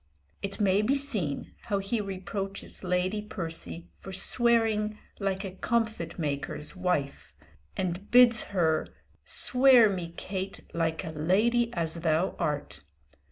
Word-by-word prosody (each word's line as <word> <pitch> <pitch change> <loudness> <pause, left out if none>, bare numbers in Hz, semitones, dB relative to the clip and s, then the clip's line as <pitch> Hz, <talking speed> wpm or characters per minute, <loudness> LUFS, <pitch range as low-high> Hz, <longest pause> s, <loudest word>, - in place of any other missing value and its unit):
It 200 +2 -5
may 200 -1 +3
be 255 +6 +2
seen 215 - 0
how 205 - 0
he 195 +3 -1
reproaches 195 0 -5
Lady 185 +3 0
Percy 170 -4 -5
for 190 - -9
swearing 220 +1 +2 0.2
"like 195 -1 -1
a 190 - -5
comfit 220 -3 -2
maker's 150 0 -4
wife," 180 -7 -2 0.4
and 185 +2 -3
bids 245 -2 +7
her 160 -5 +1 0.4
"swear 250 -4 +5
me, 175 -3 -4
Kate, 190 0 -5
like 165 -1 -1
a 160 - -5
lady 215 +10 +2
as 165 -1 -2
thou 165 +2 +1
art!" 150 -4 -2
190 Hz, 125 wpm, -28 LUFS, 170-215 Hz, 0.4 s, bids